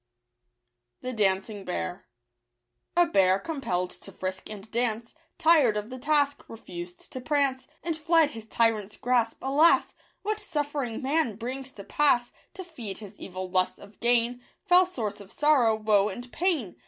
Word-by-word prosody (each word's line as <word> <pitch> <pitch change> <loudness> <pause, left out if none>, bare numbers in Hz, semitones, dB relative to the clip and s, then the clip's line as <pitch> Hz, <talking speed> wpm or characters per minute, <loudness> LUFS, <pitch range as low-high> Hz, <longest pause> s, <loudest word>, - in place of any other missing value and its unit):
®|j 255 - -3
t - - -7
dancing 195 +2 0 1.4
A 350 - +7
bear, 190 - +3
compelfd 195 - -3
to - - -9
frisk 185 0 -5
and 215 0 -9
dance, 230 -1 -1 0.2
Tired 300 -10 +5
of 210 +3 -4
the 255 - -6
task, 285 0 +1
refused 175 -5 -9
to 255 - -5
prance, 270 -2 0 0.2
And 330 -1 -1
fled 320 -1 +3
his 225 -1 -9
tyrant's 220 -3 +1
grasp. 240 -2 +1
Alas! 290 +5 +4 0.3
What 430 +1 -1
suffering 290 - -2
man 275 -5 +1
brings 260 +4 -5
to 200 - -10
pass 245 -1 +2 0.2
To 375 - -6
feed 245 - -7
his 205 -1 -11
evil 185 0 -6
lust 185 0 +1
of 200 0 -15
gain 240 +1 +2
— - - -45
Fell 360 0 +6
source 215 - -4
of 195 - -13
sorrow, 275 -7 +4
woe, 215 -2 +3
and 245 +5 -8
pain 305 - 0
240 Hz, 155 wpm, -27 LUFS, 210-295 Hz, 1.4 s, A